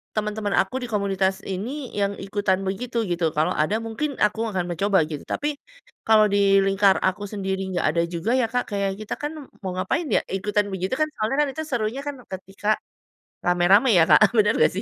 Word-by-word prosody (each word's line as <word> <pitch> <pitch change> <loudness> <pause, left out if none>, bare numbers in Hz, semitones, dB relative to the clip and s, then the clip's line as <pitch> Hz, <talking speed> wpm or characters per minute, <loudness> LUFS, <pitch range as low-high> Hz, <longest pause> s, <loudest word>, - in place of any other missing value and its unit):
teman-teman 210 -1 -1
aku 255 +7 0
di - - -4
komunitas 195 -2 0
ini 245 +9 -5
yang 200 -1 0
ikutan 195 -1 -1
begitu, 230 +4 -2
gitu? 175 -2 0
Kalau 160 +4 +1
ada, 155 +8 +1
mungkin 265 +6 -3
aku 210 +1 +2
akan 185 -3 -1
mencoba 190 -1 +2
gitu. 150 -3 -5
Tapi 295 0 -2 0.5
kalau 215 -1 +6
di 200 -1 +4
lingkar 195 0 +4
aku 190 +2 0
sendiri 195 -2 -3
enggak 180 -2 0
ada 170 - +2
juga 175 +6 -2
ya, 250 -3 +2
Kak, 245 +1 0
kayak 195 -1 -1
kita 215 - -5
kan 295 +1 -2 0.3
mau 190 - -3
ngapain 200 - -1
ya - - +3
ikutan 205 +1 0
begitu 190 +4 -2
kan? 310 - +4
Soalnya 220 +5 -1
kan 295 - +2
itu 315 - -4
serunya 240 0 -2
kan 290 - -3 0.2
ketika 195 +2 -8 0.8
rame-rame 180 +7 +4
ya, 165 - +7
Kak. - - +8
Eee, 215 - +4
bener 210 +1 +4
enggak - - +4
sih? 195 - -2
200 Hz, 200 wpm, -23 LUFS, 190-220 Hz, 0.8 s, Kak